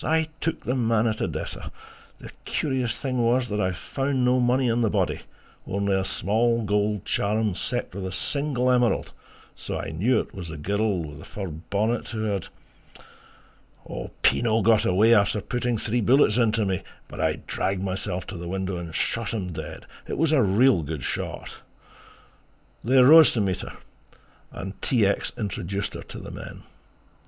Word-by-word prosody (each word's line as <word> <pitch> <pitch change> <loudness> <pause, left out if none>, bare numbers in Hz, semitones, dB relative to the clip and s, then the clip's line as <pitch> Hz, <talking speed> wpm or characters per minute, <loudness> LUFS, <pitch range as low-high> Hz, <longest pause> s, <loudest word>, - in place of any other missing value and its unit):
I 160 0 +1
took 165 - -2
the 125 - 0
man 115 -3 +2
at 110 -2 -1
Odessa...." - - -4 0.2
"... - - -25
the - - -10
curious 130 -5 -1
thing 130 -2 -2
was 120 +1 +2
that 105 0 -1
I 95 - +1
found 135 - -1
no 125 +1 +3
money 125 +1 +2
on 120 +1 +1
the 115 - +2
body, 95 -4 0 0.5
only 100 0 0
a 95 0 +1
small 115 +5 +1
gold 105 -1 0
charm 105 0 0
set 120 +5 -2
with 95 0 -4
a - - -5
single 130 +5 0
emerald, 125 -2 +2 0.4
so - - -5
I 80 - -5
knew 110 +9 +2
it - - -6
was 90 -3 -6
the 80 - -6
girl 100 +2 0
with 75 -2 -9
the - - -11
fur 95 -3 -6
bonnet 100 +9 -2
who 110 -2 -4
had..." 100 -4 -2 0.9
"... - - -12
Pinot 115 -2 +3
got 110 0 +4
away 105 +6 +5
after 105 -1 +3
putting 120 +2 -1
three 115 +3 0
bullets 120 -1 +4
into 115 -2 +2
me, 95 -2 -1 0.3
but - - -7
I - - +2
dragged 95 0 -2
myself 95 -1 -2
to 100 - -7
the 85 0 -6
window 95 0 -2
and 85 -2 -7
shot 115 -1 -1
him 90 -5 -4
dead - - -7 0.2
it - - -4
was 160 0 +2
a 150 -4 +4
real 110 +1 +4
good 75 -2 -5
shot...!" - - -4 1.2
They 130 +4 +4
rose 155 +5 +8
to 115 - +1
meet 95 -3 -1
her - - -8 0.8
and 95 +1 -8
T. 115 -6 +2
X. 100 - 0
introduced 100 -2 -3
her - - -6
to - - -10
the - - -8
men. - - -9
110 Hz, 180 wpm, -25 LUFS, 95-120 Hz, 1.2 s, rose